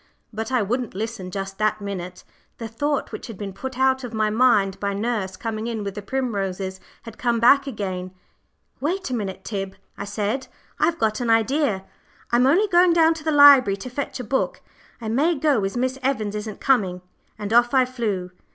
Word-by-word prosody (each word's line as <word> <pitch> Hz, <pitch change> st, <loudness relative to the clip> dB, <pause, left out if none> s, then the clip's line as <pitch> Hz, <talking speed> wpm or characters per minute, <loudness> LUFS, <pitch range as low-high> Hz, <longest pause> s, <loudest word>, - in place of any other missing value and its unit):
But 220 Hz, +3 st, -4 dB
I 250 Hz, -4 st, +2 dB
wouldn't 240 Hz, +1 st, -2 dB
listen 215 Hz, -3 st, -4 dB
just 195 Hz, +1 st, -5 dB
that 215 Hz, 0 st, +1 dB
minute. 185 Hz, -3 st, -6 dB, 0.3 s
The 230 Hz, -, -5 dB
thought 285 Hz, +6 st, -2 dB
which -, -, -7 dB
had 225 Hz, -5 st, -8 dB
been 200 Hz, -1 st, -6 dB
put 260 Hz, +6 st, -6 dB
out 265 Hz, 0 st, +2 dB
of 235 Hz, -2 st, -6 dB
my 215 Hz, -1 st, +1 dB
mind 210 Hz, -5 st, +3 dB
by 200 Hz, -1 st, -2 dB
nurse 205 Hz, -3 st, -2 dB
coming 225 Hz, -1 st, -4 dB
in 225 Hz, -3 st, -3 dB
with 200 Hz, -1 st, -4 dB
the 205 Hz, -, -6 dB
primroses 195 Hz, -6 st, -3 dB, 0.2 s
had 230 Hz, -2 st, -11 dB
come 235 Hz, -2 st, +1 dB
back 275 Hz, +4 st, +5 dB
again. 190 Hz, -7 st, -4 dB, 0.7 s
"Wait 345 Hz, +2 st, -2 dB
a -, -, -1 dB
minute, 200 Hz, -5 st, -4 dB
Tib," 195 Hz, -3 st, -4 dB, 0.2 s
I 200 Hz, -, -4 dB
said, 210 Hz, +5 st, -2 dB, 0.3 s
"I've 335 Hz, 0 st, +2 dB
got 215 Hz, -6 st, 0 dB
an 240 Hz, -, -1 dB
idea. 225 Hz, -2 st, +2 dB, 0.5 s
I'm 245 Hz, +2 st, +4 dB
only 370 Hz, +10 st, +4 dB
going 350 Hz, -2 st, +5 dB
down 330 Hz, -1 st, +5 dB
to 320 Hz, -1 st, -10 dB
the 315 Hz, -, 0 dB
library 280 Hz, -8 st, +7 dB
to 245 Hz, +6 st, -8 dB
fetch 275 Hz, +1 st, -4 dB
a -, -, -4 dB
book. 265 Hz, +4 st, -1 dB, 0.4 s
I 230 Hz, -, -6 dB
may 290 Hz, +10 st, +2 dB
go 275 Hz, -7 st, +2 dB
as 195 Hz, +5 st, -2 dB
Miss 260 Hz, +2 st, -1 dB
Evans 235 Hz, -6 st, -1 dB
isn't 210 Hz, 0 st, -5 dB
coming;" 190 Hz, -9 st, +1 dB, 0.3 s
and 210 Hz, 0 st, -4 dB
off 240 Hz, 0 st, +5 dB
I 260 Hz, -1 st, +5 dB
flew. 210 Hz, -8 st, -3 dB
225 Hz, 195 wpm, -23 LUFS, 200-265 Hz, 0.7 s, library